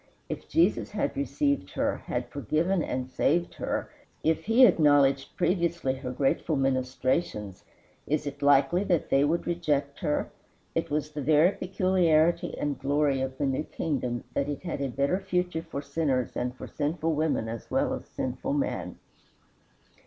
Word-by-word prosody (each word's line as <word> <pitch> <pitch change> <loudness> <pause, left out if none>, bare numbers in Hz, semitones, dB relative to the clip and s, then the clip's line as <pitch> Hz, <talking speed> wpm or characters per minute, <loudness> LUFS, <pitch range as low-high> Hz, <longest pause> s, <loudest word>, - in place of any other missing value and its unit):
If - - -6
Jesus 330 - +2
had - - -1
received 285 0 -1
her, - - 0
had - - -2
forgiven 170 +4 0
and 130 -3 -2
saved 170 +6 +1
her; - - -3 0.3
if 160 0 +1
he 230 +4 +7
acknowledged 145 - +3
previously 170 -6 +1
her 130 -1 -6
grateful 135 +4 0
ministrations, 130 - -1 0.4
is 150 0 0
it 145 0 -6
likely 145 +6 +4
that 175 -5 0
they 135 +1 +4
would 165 +4 +1
reject 145 -5 -1
her? 150 -3 -1 0.4
It - - -1
was 150 +1 -2
the 150 - -4
very 155 +5 +5
peculiarity 180 -4 +2
and 145 -1 -2
glory 145 -1 +1
of 130 0 -3
the 145 - 0
new 135 +2 0
kingdom 125 -6 -2
that 140 - -1
it 145 - -4
had 170 -5 -4
a 140 - 0
better 140 +8 0
future 180 -3 -1
for 160 -4 -6
sinners, 140 -4 0
and 125 0 -2
for - - -7
sinful 160 +2 -1
woman 150 -7 0
as 115 0 -6
well - - +1
as - - -6
sinful 130 +2 -3
man. 145 - -2
150 Hz, 160 wpm, -28 LUFS, 135-170 Hz, 0.4 s, he